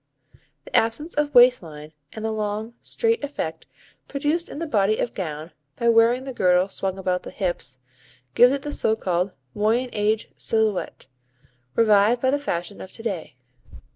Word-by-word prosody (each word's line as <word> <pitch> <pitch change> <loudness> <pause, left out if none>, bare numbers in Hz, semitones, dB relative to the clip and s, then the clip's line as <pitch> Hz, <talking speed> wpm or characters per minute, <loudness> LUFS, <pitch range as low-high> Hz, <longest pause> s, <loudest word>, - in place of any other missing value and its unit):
The - - -7
absence 230 +9 +1
of 290 -1 -1
waist 245 +1 +7
line, 155 -2 -11 0.2
and 220 0 -6
the 220 - -1
long, 215 +1 -3
straight 455 -3 0
effect 165 - -5 0.4
produced 295 +4 -1
in - - -8
the 335 - -3
body 215 -6 +2
of 235 - -2
gown 160 -3 -5 0.2
by 235 - +1
wearing 230 +2 +4
the 265 -1 -6
girdle 180 -3 +3
swung 190 0 -3
about 185 -1 -1
the - - -9
hips, 175 - -3 0.6
gives 245 +1 +6
it 275 0 -2
the 295 - -4
so 220 -6 +1
called 180 -2 -1 0.2
Moyen 230 +4 +1
Age 210 +1 0
silhouette, 220 -3 -1 0.7
revived 215 +1 +4
by 260 +1 +2
the 285 - +1
fashion 175 -8 -4
of 190 - -9
to 225 - -7
day. 185 - -4
220 Hz, 170 wpm, -23 LUFS, 185-250 Hz, 0.7 s, waist